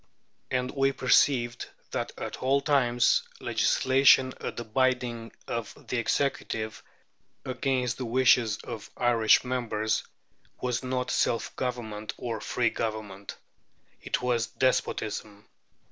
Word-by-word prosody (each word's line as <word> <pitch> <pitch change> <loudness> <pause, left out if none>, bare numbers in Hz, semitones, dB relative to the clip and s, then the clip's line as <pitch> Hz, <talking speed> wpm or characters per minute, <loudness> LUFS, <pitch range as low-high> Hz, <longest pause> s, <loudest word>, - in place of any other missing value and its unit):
And 125 0 -1
we 135 -1 +2
perceived 125 -1 +2 0.2
that - - -2
at - - -5
all 135 +2 +2
times 125 -5 +3 0.2
legislation 130 0 +4
at - - -5
the 120 - -3
bidding 120 -1 0 0.2
of 115 -2 -4
the 125 - 0
Executive, 115 -3 -1 0.6
against 130 -1 -1
the 130 - -3
wishes 120 -2 +3
of 110 - -7
Irish 115 -3 +4
members, 110 -4 -1 0.6
was 125 -1 -1
not 130 -1 -2
self 115 - 0
government 110 -4 -4
or 115 -3 -4
free 120 -2 0
government. 110 -3 -5 0.6
It - - -2
was 120 -2 +1
despotism. 105 -5 -1
120 Hz, 115 wpm, -28 LUFS, 110-130 Hz, 0.6 s, legislation